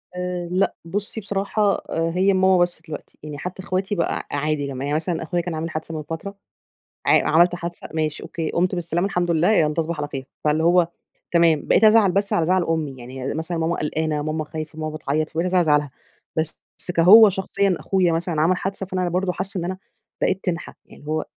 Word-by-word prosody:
آآ، 180 -1 -3
لأ 185 +2 +1
بصي 205 +5 -4
بصراحة، 200 +1 0
هي 175 +4 +2
ماما 190 0 +4
بس 175 -2 +1
دلوقتي، 155 -2 -9
يعني 150 -1 -6
حتى 180 +5 -6
اخواتي 190 +3 -1
بقى 170 - -1
ع - - -1
عادي 150 -1 -1
لما 135 -1 -5
يعني 145 +1 0
مثلًا 165 +1 -1
أخويا 175 +2 -1
كان 170 -1 -4
عامل 160 +1 -3
حادثة 160 0 -5
من 155 - -4
فترة، 165 +6 -6 0.7
ع - - +4
عملت 175 +3 +5
حادثة، 175 0 -6
ماشي، 155 -1 -2
أوكي، 165 -2 -4
قُمت 180 +2 +1
بالسلامة 175 +1 -1
الحمد 180 -3 -1
لله، 170 +3 +3
يالّا 155 -7 +3
تصبح 165 0 -2
على 145 0 -3
خير، 135 -2 -6 0.2
فاللي 150 +1 +2
هو 175 0 +4 0.4
تمام 170 -3 +3
بقيت - - +4
أزعل 215 -3 +6
بس 200 +2 0
على 165 - +2
زعل 185 +1 +3
أمي، 160 -4 -1
يعني 130 +2 -5
مثلًا 160 +2 -3
ماما 165 +1 0
قلقانة 155 0 -1
ماما 155 +1 -2
خايفة 155 0 -7
ماما 155 0 -4
بتعيط، 155 +1 -1
فبقيت 165 +3 -1
أزعل 185 0 0
على - - +3
زعلها، 150 -2 +2 0.5
بس 160 0 -2 0.4
كهو 205 +6 +9
شخصيًّا 195 0 0
أخويا 185 -3 +1
مثلًا 165 -1 -1
عمل 175 +4 +3
حادثة 195 +1 -4
فأنا 185 -1 -1
برضه 180 +1 0
حاسة 195 +1 -4
إن 170 - -3
أنا 185 +1 -3 0.4
بقيت 190 0 0
تنحة، 170 -2 -3
يعني 145 - -16
هو 155 +1 -1
170 Hz, 205 wpm, -22 LUFS, 155-185 Hz, 0.7 s, كهو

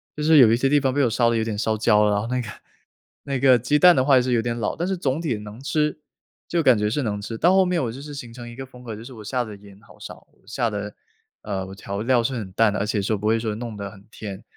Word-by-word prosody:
就 150 - -4
是 160 0 +5
有 120 -5 +7
一 115 - +4
些 135 +3 +1
地 145 +1 +4
方 135 -2 0
被 145 - +2
我 125 - +3
烧 120 +1 +2
得 115 - 0
有 110 - 0
点 110 -2 -3
烧 110 0 0
焦 105 -1 +3
了， 105 - +2
然 100 - +1
后 110 - -5
那 125 +1 -1
个 120 - -7 0.8
那 140 -2 -3
个 130 -2 +5
鸡 145 +6 +1
蛋 180 +3 +7
的 130 - +3
话 135 0 +4
也 130 - +5
是 125 0 -2
有 120 - +2
点 120 +1 -3
老， 110 -3 -2
但 175 +2 -2
是 190 - -1
总 140 -2 -1
体 150 -8 -1
能 105 +2 -10
吃， 150 +1 -1 0.5
就 170 -1 0
感 130 -5 +5
觉 105 0 0
是 140 +6 -1
能 105 -3 -3
吃， 115 +2 -6
到 175 +8 +4
后 190 0 +5
面 180 -4 0
我 115 - -2
就 130 +4 -9
是 145 +1 -9
形 120 -5 -8
成 120 0 -9
一 120 - -11
个 135 - -7
风 125 -1 -15
格， 115 -3 -6
就 110 - -10
是 130 +2 -11
我 110 -3 -11
下 125 +4 -1
的 105 -3 -9
盐 100 -1 -16
好 - - -19
少， - - -11 0.2
下 120 +1 -1
的 105 -1 -5 0.5
呃， 95 -3 -4
我 95 - -9
调 100 +1 -5
料 120 0 +2
是 130 - -1
很 105 -6 -5
淡 105 0 +3
的， - - -2
而 100 - 0
且 105 -2 0
说 105 +2 -1
不 105 - -3
会 115 +1 +2
说 110 -1 -2
弄 115 -2 -6
得 100 -1 -6
很 100 -2 -16
甜， 100 -4 -8
120 Hz, 340 characters per minute, -23 LUFS, 105-135 Hz, 0.8 s, 有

